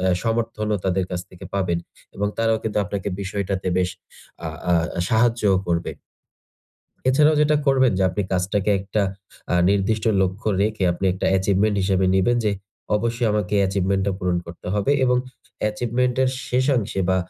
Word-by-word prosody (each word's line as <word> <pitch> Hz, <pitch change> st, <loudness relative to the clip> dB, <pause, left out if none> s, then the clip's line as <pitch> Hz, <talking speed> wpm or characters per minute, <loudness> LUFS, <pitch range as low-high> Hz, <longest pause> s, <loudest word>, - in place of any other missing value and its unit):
অ্যা 95 Hz, 0 st, +2 dB
সমর্থনও 115 Hz, -2 st, -1 dB
তাদের 95 Hz, 0 st, +1 dB
কাছ 90 Hz, -1 st, -2 dB
থেকে 90 Hz, -, -12 dB
পাবেন। 90 Hz, -3 st, 0 dB, 0.4 s
এবং 100 Hz, +1 st, 0 dB
তারাও 115 Hz, -1 st, +2 dB
কিন্তু 105 Hz, -1 st, -1 dB
আপনাকে 100 Hz, +1 st, -3 dB
বিষয়টাতে 95 Hz, -1 st, -2 dB
বেশ 90 Hz, 0 st, +1 dB, 0.6 s
আ -, -, -2 dB, 0.2 s
আ -, -, +5 dB, 0.4 s
সাহায্যও 110 Hz, -3 st, +3 dB
করবে। 85 Hz, -1 st, -1 dB, 1.2 s
এছাড়াও 150 Hz, +4 st, +5 dB
যেটা 150 Hz, 0 st, +4 dB
করবেন 130 Hz, -4 st, +4 dB
যে -, -, +2 dB
আপনি 100 Hz, +3 st, -2 dB
কাজটাকে 95 Hz, +3 st, 0 dB
একটা 100 Hz, +2 st, -1 dB, 0.5 s
আ -, -, +3 dB, 0.2 s
নির্দিষ্ট 100 Hz, +2 st, +1 dB, 0.2 s
লক্ষ্য 95 Hz, +4 st, -2 dB
রেখে 105 Hz, -2 st, 0 dB
আপনি 90 Hz, -, -5 dB
একটা 95 Hz, -, -2 dB
achievement 100 Hz, +2 st, +1 dB
হিসেবে 95 Hz, -1 st, +2 dB
নিবেন 110 Hz, +6 st, +3 dB
যে 105 Hz, -, +3 dB, 0.5 s
অবশ্যই 115 Hz, +2 st, -1 dB
আমাকে 105 Hz, -1 st, -1 dB
achievement 95 Hz, 0 st, 0 dB
টা 100 Hz, -, +1 dB
পূরণ 90 Hz, -2 st, 0 dB
করতে 85 Hz, +1 st, -11 dB
হবে 105 Hz, +7 st, +2 dB
এবং 125 Hz, 0 st, +3 dB, 0.5 s
achievement 120 Hz, +3 st, 0 dB
এর 130 Hz, -, +2 dB, 0.2 s
শেষাংশে 125 Hz, -6 st, +1 dB
বা 95 Hz, -, +3 dB
100 Hz, 155 wpm, -22 LUFS, 95-115 Hz, 1.2 s, আ